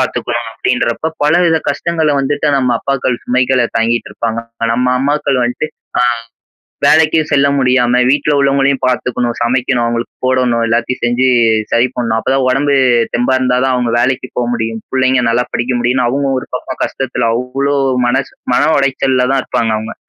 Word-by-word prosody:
பாத்துக்கணும் 120 Hz, -2 st, -2 dB
அப்பிடின்றப்ப 125 Hz, +6 st, -1 dB
பலவித 165 Hz, +1 st, +3 dB
கஷ்டங்கள 160 Hz, +1 st, -1 dB
வந்துட்டு 145 Hz, +2 st, -1 dB
நம்ம 125 Hz, -2 st, +1 dB
அப்பாக்கள் 130 Hz, -3 st, -2 dB
சுமைகள 125 Hz, +1 st, +1 dB, 0.2 s
தாங்கிட்டுருப்பாங்க. 115 Hz, 0 st, -2 dB, 0.3 s
நம்ம 125 Hz, +1 st, 0 dB
அம்மாக்கள் 140 Hz, -1 st, 0 dB
வந்ட்டு 125 Hz, +5 st, -2 dB, 0.3 s
அ -, -, +3 dB, 0.8 s
வேலைக்கி 160 Hz, 0 st, +4 dB
செல்ல 140 Hz, 0 st, +3 dB
முடியாம 125 Hz, -2 st, +2 dB
வீட்ல 145 Hz, +1 st, +1 dB
உள்ளவங்களையும் 140 Hz, -1 st, +2 dB
பாத்துக்கணும், 125 Hz, -1 st, -1 dB
சமைக்கணும், 125 Hz, 0 st, 0 dB
அவுங்களுக்கு 115 Hz, 0 st, -3 dB
போடணும், 125 Hz, -2 st, +1 dB
எல்லாத்தையும் 120 Hz, +2 st, -1 dB
செஞ்சு 120 Hz, +2 st, +1 dB, 0.4 s
சரி 120 Hz, +2 st, +3 dB
பண்ணனும். 115 Hz, -2 st, -1 dB
அப்பதான் 135 Hz, +2 st, 0 dB
உடம்பு 140 Hz, +2 st, +1 dB, 0.4 s
தெம்பா 125 Hz, +2 st, +1 dB
இருந்தாதான் 130 Hz, +1 st, +1 dB
அவுங்க 120 Hz, -2 st, -1 dB
வேலைக்கு 130 Hz, +1 st, 0 dB
போ 125 Hz, -, +1 dB
முடியும், 115 Hz, -1 st, -3 dB
புள்ளைங்க 130 Hz, -1 st, +2 dB
நல்லா 120 Hz, +2 st, +1 dB
படிக்க 120 Hz, +2 st, -1 dB
முடியுன்னு 125 Hz, +1 st, +1 dB
அவுங்க 135 Hz, +3 st, -1 dB
ஒரு -, -, -11 dB
பக்கம் 130 Hz, +1 st, -6 dB
கஷ்டத்துல, 130 Hz, -3 st, -2 dB
அவ்ளோ 135 Hz, +3 st, -1 dB, 0.3 s
மனச 130 Hz, +2 st, 0 dB, 0.2 s
மன -, -, +3 dB
உடைச்சல்ல 130 Hz, -2 st, +1 dB
தான் 135 Hz, -, +1 dB
இருப்பாங்க 115 Hz, -2 st, -1 dB
அவுங்க. 110 Hz, +1 st, -6 dB
125 Hz, 145 wpm, -14 LUFS, 120-135 Hz, 0.8 s, வேலைக்கி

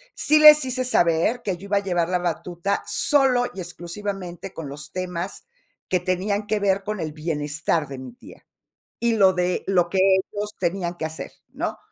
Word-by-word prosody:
sí 305 Hz, +1 st, +3 dB
les 300 Hz, -2 st, +9 dB
hice 255 Hz, 0 st, -1 dB
saber 175 Hz, +2 st, +2 dB
que 190 Hz, -4 st, -2 dB
yo 195 Hz, -, -11 dB
iba 200 Hz, 0 st, +1 dB
a -, -, +4 dB
llevar 175 Hz, -3 st, 0 dB
la 180 Hz, -, +2 dB
batuta 175 Hz, +2 st, -2 dB
solo, 265 Hz, -4 st, +3 dB
y 190 Hz, -, -9 dB
exclusivamente 180 Hz, +1 st, -6 dB
con 165 Hz, -3 st, -7 dB
los 150 Hz, +2 st, -8 dB
temas 180 Hz, 0 st, -5 dB, 0.4 s
que 185 Hz, -, +2 dB
tenían 195 Hz, +3 st, -1 dB
que 215 Hz, -1 st, 0 dB
ver 195 Hz, -1 st, +1 dB
con 210 Hz, -1 st, -4 dB
el 155 Hz, -1 st, -3 dB
bienestar 155 Hz, 0 st, -2 dB
de 135 Hz, -2 st, -8 dB
mi 130 Hz, -2 st, -9 dB
tía, -, -, -15 dB, 0.6 s
y 235 Hz, 0 st, +1 dB
lo 195 Hz, -3 st, +5 dB
de 180 Hz, 0 st, -1 dB
lo 180 Hz, -3 st, +3 dB
que 190 Hz, -, -2 dB, 0.3 s
ellos 210 Hz, 0 st, -4 dB
tenían 175 Hz, -1 st, -2 dB
que 160 Hz, -, -5 dB
hacer, 160 Hz, -1 st, -5 dB, 0.2 s
¿no? -, -, -3 dB
185 Hz, 185 wpm, -23 LUFS, 170-205 Hz, 0.6 s, les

